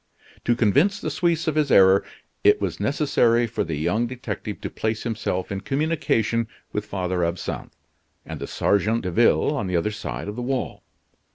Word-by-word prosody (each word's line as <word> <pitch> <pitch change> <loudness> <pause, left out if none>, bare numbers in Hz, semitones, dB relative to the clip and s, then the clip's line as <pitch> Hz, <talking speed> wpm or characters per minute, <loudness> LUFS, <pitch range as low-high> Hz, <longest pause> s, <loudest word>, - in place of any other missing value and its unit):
To 120 - +3
convince 140 - +3
the - - -3
Suisse 170 -2 0
of 160 - +2
his 150 -1 +1
error 95 -2 +6 0.4
it - - +5
was - - -3
necessary 120 0 +2
for 115 - -2
the 80 -2 -3
young 90 +11 0
detective 120 -4 -5
to - - -4
place 110 0 -2
himself 110 -6 -2
in 100 -1 -3
communication 120 -5 0 0.2
with 105 0 -3
Father 90 -3 -1
Absinthe 85 +1 -4 0.5
and - - -7
the - - -5
sergeant 110 +3 +1
de 90 - -2
ville 120 - +3
on 115 -9 -2
the 90 -1 0
other 95 +6 0
side 105 - -5
of 105 - -5
the 125 - -4
wall. 130 +1 -3
115 Hz, 180 wpm, -24 LUFS, 100-130 Hz, 0.5 s, error